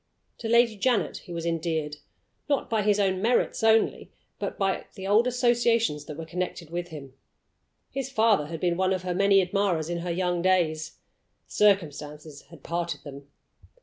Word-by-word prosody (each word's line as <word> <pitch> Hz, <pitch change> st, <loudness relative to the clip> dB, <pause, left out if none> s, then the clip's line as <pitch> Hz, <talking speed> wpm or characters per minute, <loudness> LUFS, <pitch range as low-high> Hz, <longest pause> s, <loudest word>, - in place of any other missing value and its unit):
To 225 Hz, -, -4 dB
Lady 235 Hz, -2 st, +4 dB
Janet 240 Hz, +1 st, +1 dB
he -, -, -11 dB
was 170 Hz, -1 st, -4 dB
endeared, 160 Hz, -3 st, -2 dB, 0.5 s
not 280 Hz, -4 st, 0 dB
by 220 Hz, -1 st, +2 dB
his 205 Hz, 0 st, +2 dB
own 190 Hz, -2 st, +1 dB
merits 235 Hz, +4 st, +1 dB
only, 225 Hz, 0 st, +2 dB, 0.3 s
but -, -, -4 dB
by 195 Hz, -1 st, -1 dB, 0.2 s
old 215 Hz, +5 st, +4 dB
associations 235 Hz, -, +1 dB
that 150 Hz, -, -8 dB
were 165 Hz, -, -6 dB
connected 175 Hz, -1 st, -5 dB
with 175 Hz, 0 st, -3 dB
him. 145 Hz, -5 st, -10 dB, 0.8 s
His 270 Hz, -1 st, -4 dB
father 220 Hz, -, +2 dB
had 165 Hz, 0 st, -6 dB
been 175 Hz, 0 st, 0 dB
one 190 Hz, 0 st, +2 dB
of 185 Hz, -1 st, -3 dB
her 180 Hz, -1 st, -2 dB
many 195 Hz, +1 st, +4 dB
admirers 180 Hz, -3 st, 0 dB
in 170 Hz, -, -2 dB
her 175 Hz, +1 st, -4 dB
young 175 Hz, 0 st, 0 dB
days. 160 Hz, -4 st, +1 dB, 0.5 s
Circumstances 150 Hz, -7 st, 0 dB
had 165 Hz, -5 st, -15 dB
parted 170 Hz, 0 st, -3 dB
them. 140 Hz, -1 st, -10 dB
180 Hz, 165 wpm, -26 LUFS, 160-210 Hz, 0.8 s, Lady